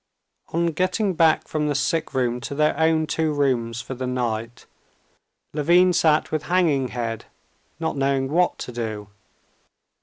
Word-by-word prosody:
On 170 Hz, +1 st, +1 dB
getting 185 Hz, +4 st, 0 dB
back 160 Hz, -1 st, +3 dB
from 150 Hz, -1 st, -1 dB
the 145 Hz, -, 0 dB
sick 155 Hz, +4 st, 0 dB
room 125 Hz, -1 st, 0 dB
to 140 Hz, -, -5 dB
their 150 Hz, +1 st, +2 dB
own 160 Hz, +1 st, +2 dB
two 160 Hz, 0 st, -1 dB
rooms 120 Hz, -5 st, 0 dB
for -, -, -6 dB
the 130 Hz, 0 st, -4 dB
night, 120 Hz, -2 st, -3 dB, 0.9 s
Levin 175 Hz, +5 st, +4 dB
sat 155 Hz, -2 st, +2 dB
with 155 Hz, -, -1 dB
hanging 155 Hz, -6 st, +1 dB
head 115 Hz, -2 st, -4 dB, 0.5 s
not 160 Hz, -2 st, -2 dB
knowing 135 Hz, -1 st, +1 dB
what 175 Hz, +2 st, +2 dB
to -, -, -6 dB
do. 110 Hz, -4 st, -5 dB
145 Hz, 150 wpm, -23 LUFS, 125-160 Hz, 0.9 s, Levin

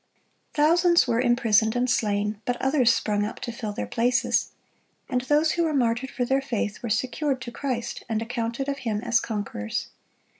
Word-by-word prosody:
(63) 295 Hz, -1 st, +4 dB
Thousands 340 Hz, -1 st, +4 dB
were 235 Hz, 0 st, +2 dB
imprisoned 230 Hz, -3 st, +3 dB
and 245 Hz, +1 st, +1 dB
slain; 210 Hz, -2 st, 0 dB
but 245 Hz, 0 st, -1 dB
others 265 Hz, -3 st, +3 dB
sprung 210 Hz, -2 st, 0 dB
up 210 Hz, -, -4 dB
to 235 Hz, -, -4 dB
fill 230 Hz, -3 st, -5 dB
their 155 Hz, -, -4 dB
places. 240 Hz, -, +1 dB, 0.6 s
And 250 Hz, -2 st, 0 dB
those 295 Hz, +5 st, +2 dB
who 340 Hz, -, +1 dB
were 315 Hz, -2 st, 0 dB
martyred 245 Hz, 0 st, +1 dB
for 250 Hz, -, -2 dB
their 270 Hz, +2 st, +1 dB
faith 220 Hz, -5 st, -3 dB
were 235 Hz, -, -4 dB
secured 260 Hz, +4 st, 0 dB
to 240 Hz, -, -6 dB
Christ, 250 Hz, -2 st, -4 dB
and 220 Hz, -1 st, 0 dB
accounted 235 Hz, +3 st, -3 dB
of 280 Hz, 0 st, -2 dB
Him 215 Hz, -3 st, -2 dB
as 235 Hz, -1 st, +3 dB
conquerors. 205 Hz, -, -4 dB
240 Hz, 185 wpm, -25 LUFS, 225-265 Hz, 0.6 s, 63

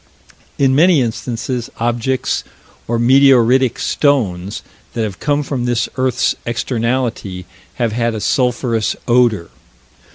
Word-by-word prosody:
In 135 Hz, -2 st, +3 dB
many 165 Hz, +3 st, +5 dB
instances, 120 Hz, +1 st, -3 dB
objects, 120 Hz, +3 st, -1 dB, 0.4 s
or 120 Hz, -, 0 dB
meteoritic 130 Hz, 0 st, +4 dB
stones, 105 Hz, -9 st, 0 dB, 0.3 s
that 115 Hz, -, -1 dB
have 100 Hz, -3 st, -5 dB
come 145 Hz, 0 st, 0 dB
from 130 Hz, -3 st, -3 dB
this 120 Hz, -1 st, 0 dB
earth's 130 Hz, -2 st, +1 dB
externality, 115 Hz, -5 st, -2 dB, 0.3 s
have 120 Hz, -2 st, -1 dB
had 115 Hz, 0 st, -1 dB
a -, -, -3 dB
sulphurous 120 Hz, -2 st, 0 dB
odor. 120 Hz, -, +2 dB
120 Hz, 110 wpm, -17 LUFS, 115-130 Hz, 0.4 s, many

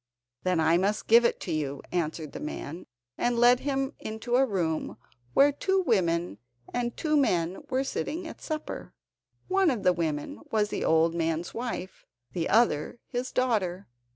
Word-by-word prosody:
"Then 185 Hz, -2 st, +1 dB
I 160 Hz, +1 st, +4 dB
must 200 Hz, +4 st, 0 dB
give 235 Hz, +1 st, +6 dB
it -, -, +1 dB
to 175 Hz, -, -4 dB
you," 145 Hz, -3 st, -2 dB
answered 160 Hz, -3 st, -2 dB
the -, -, -7 dB
man, 150 Hz, +2 st, -6 dB, 0.3 s
and 240 Hz, 0 st, +1 dB
led 240 Hz, +1 st, +6 dB
him 270 Hz, -1 st, -1 dB
into 220 Hz, +3 st, -3 dB
a 265 Hz, +1 st, +4 dB
room 170 Hz, -7 st, -1 dB, 0.4 s
where 285 Hz, +1 st, +6 dB
two 380 Hz, +7 st, +1 dB
women 175 Hz, -, +1 dB, 0.3 s
and 240 Hz, -1 st, -2 dB
two 305 Hz, -2 st, +1 dB
men 180 Hz, -, +1 dB
were 260 Hz, +1 st, +1 dB
sitting 325 Hz, +5 st, -3 dB
at -, -, -10 dB
supper. 310 Hz, -1 st, -5 dB, 0.5 s
One 385 Hz, -1 st, +3 dB
of 240 Hz, -8 st, -1 dB
the 180 Hz, -, +5 dB
women 155 Hz, -4 st, -2 dB
was 210 Hz, -1 st, +1 dB
the -, -, -2 dB
old 160 Hz, +1 st, +3 dB
man's 165 Hz, 0 st, -1 dB
wife, 230 Hz, -6 st, -5 dB, 0.3 s
the 170 Hz, -2 st, -1 dB
other 220 Hz, -4 st, +2 dB
his 250 Hz, 0 st, -4 dB
daughter. 205 Hz, -7 st, 0 dB
210 Hz, 165 wpm, -28 LUFS, 165-250 Hz, 0.5 s, give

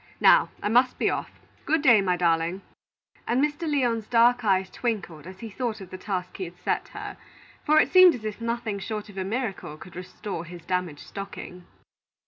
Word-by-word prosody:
Now -, -, +6 dB
I -, -, +1 dB
must 245 Hz, +4 st, +3 dB
be -, -, +2 dB
off. -, -, -3 dB, 0.4 s
Good 315 Hz, 0 st, +2 dB
by, 235 Hz, -7 st, +7 dB
my 180 Hz, -2 st, +1 dB
darling," 170 Hz, +2 st, +1 dB, 0.6 s
and 240 Hz, -, +2 dB
Mr. 300 Hz, +3 st, 0 dB
Lyon's 235 Hz, -6 st, +1 dB
dark 245 Hz, +1 st, +4 dB
eyes 190 Hz, -2 st, +2 dB
twinkled 195 Hz, -10 st, -3 dB
as 185 Hz, +1 st, -11 dB
he 225 Hz, -, -6 dB
thought 230 Hz, 0 st, -3 dB
of 190 Hz, -2 st, -11 dB
the 185 Hz, -, -6 dB
task 185 Hz, -2 st, -4 dB
he 190 Hz, -, -3 dB
had 175 Hz, +1 st, -11 dB
set -, -, -1 dB
her; -, -, -8 dB, 0.5 s
for 310 Hz, 0 st, +5 dB
it -, -, +3 dB
seemed 370 Hz, -2 st, +8 dB
as 220 Hz, -3 st, -9 dB
if 215 Hz, +1 st, -5 dB
nothing 230 Hz, -3 st, -2 dB
short 210 Hz, +1 st, -5 dB
of 200 Hz, -, -13 dB
a -, -, -1 dB
miracle 200 Hz, -7 st, -3 dB
could 175 Hz, +2 st, -13 dB
restore 180 Hz, 0 st, -6 dB
his 170 Hz, 0 st, -10 dB
damaged 180 Hz, -5 st, -2 dB
stocking. 190 Hz, -2 st, -8 dB
205 Hz, 195 wpm, -26 LUFS, 180-240 Hz, 0.6 s, seemed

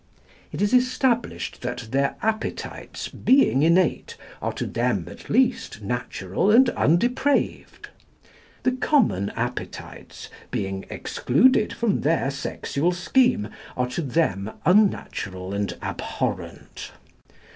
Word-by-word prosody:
It -, -, -2 dB
is 205 Hz, -, +1 dB
established 250 Hz, -1 st, +1 dB
that 125 Hz, -2 st, -5 dB
their 140 Hz, +1 st, +1 dB
appetites, 220 Hz, 0 st, -3 dB
being 260 Hz, -, +3 dB
innate, 170 Hz, +2 st, +2 dB, 0.2 s
are -, -, -1 dB
to -, -, -3 dB
them 115 Hz, -7 st, -1 dB
at -, -, -12 dB
least 230 Hz, -, +1 dB
natural 110 Hz, -, -2 dB
and 240 Hz, +3 st, +6 dB
undepraved; 250 Hz, -, 0 dB, 0.8 s
the 255 Hz, -, +3 dB
common 255 Hz, -, +2 dB
appetites, -, -, -6 dB, 0.2 s
being 95 Hz, 0 st, -3 dB
excluded 220 Hz, -, +2 dB
from 230 Hz, -4 st, 0 dB
their 150 Hz, -3 st, +1 dB
sexual 140 Hz, +3 st, -2 dB
scheme, 180 Hz, -, +2 dB, 0.3 s
are 125 Hz, 0 st, 0 dB
to 170 Hz, -, -3 dB
them 120 Hz, -, 0 dB, 0.2 s
unnatural 100 Hz, -, +1 dB
and 100 Hz, 0 st, -2 dB
abhorrent. -, -, -5 dB
165 Hz, 105 wpm, -24 LUFS, -, 0.8 s, and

